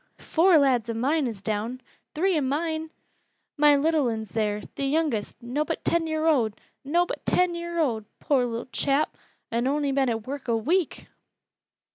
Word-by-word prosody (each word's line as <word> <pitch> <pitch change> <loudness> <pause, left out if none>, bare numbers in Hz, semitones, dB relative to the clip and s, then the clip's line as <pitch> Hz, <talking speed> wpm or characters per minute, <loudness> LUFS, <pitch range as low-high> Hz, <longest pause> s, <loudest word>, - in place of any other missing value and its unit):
"Four 340 +1 +4
lads 255 -6 +2
o' 230 - -2
mine 275 +5 +1
is 210 -4 -7
down!" 220 +4 -2 0.4
"Three 370 +4 +2
o' 305 - +2
mine!" 315 +4 -1 0.7
"My 295 -1 +6
little 300 -1 +2
un's 220 -2 -3
theer 210 -2 0
th' - - -14
youngest 275 -6 0
nobbut 295 +7 -2
ten 335 -1 +2
year 315 0 -1
owd 245 -10 +2 0.2
nobbut 345 +6 0
ten 360 -1 +2
year 340 0 -5
owd, 235 -10 0
poor 275 -4 +2
little 235 -1 -3
chap! 280 +2 +1 0.4
an' 235 +2 0
ony 285 0 +1
been 270 -1 +2
at 225 -2 -2
work 280 +1 -6
a 230 -1 +2
week!" 335 - 0
280 Hz, 165 wpm, -26 LUFS, 235-320 Hz, 0.7 s, My